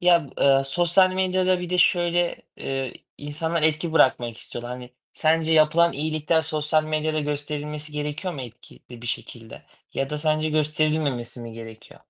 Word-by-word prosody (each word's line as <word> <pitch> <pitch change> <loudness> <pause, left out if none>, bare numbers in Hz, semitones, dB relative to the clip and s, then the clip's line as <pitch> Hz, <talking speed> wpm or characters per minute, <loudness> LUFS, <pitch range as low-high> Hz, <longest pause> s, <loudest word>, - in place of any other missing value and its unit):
Ya, 175 -3 +4
eee, 135 -1 +5
sosyal 175 +5 +4
medyada 185 -1 +1
bir 180 0 -6
de 180 - 0
şöyle, 175 0 +2 0.2
eee, 135 -2 -3 0.3
insanlar 155 +3 -1
etki 160 +1 +1
bırakmak 120 -6 +3
istiyorlar. 120 +1 -7
Hani, 125 0 -9 0.2
sence 160 0 +1
yapılan 160 +2 +4
iyilikler 155 +2 0
sosyal 155 0 +1
medyada 155 0 -1
gösterilmesi 150 +1 -4
gerekiyor 150 +5 -4
mu 135 - -6
etkili 120 0 -12
bir - - -7
şekilde 115 -1 -6 0.3
ya 135 +1 -2
da 150 - -2
sence 155 0 +1
gösterilmemesi 150 -5 0
mi 115 -1 -8
gerekiyor? 115 -1 -11
155 Hz, 150 wpm, -24 LUFS, 135-165 Hz, 0.3 s, eee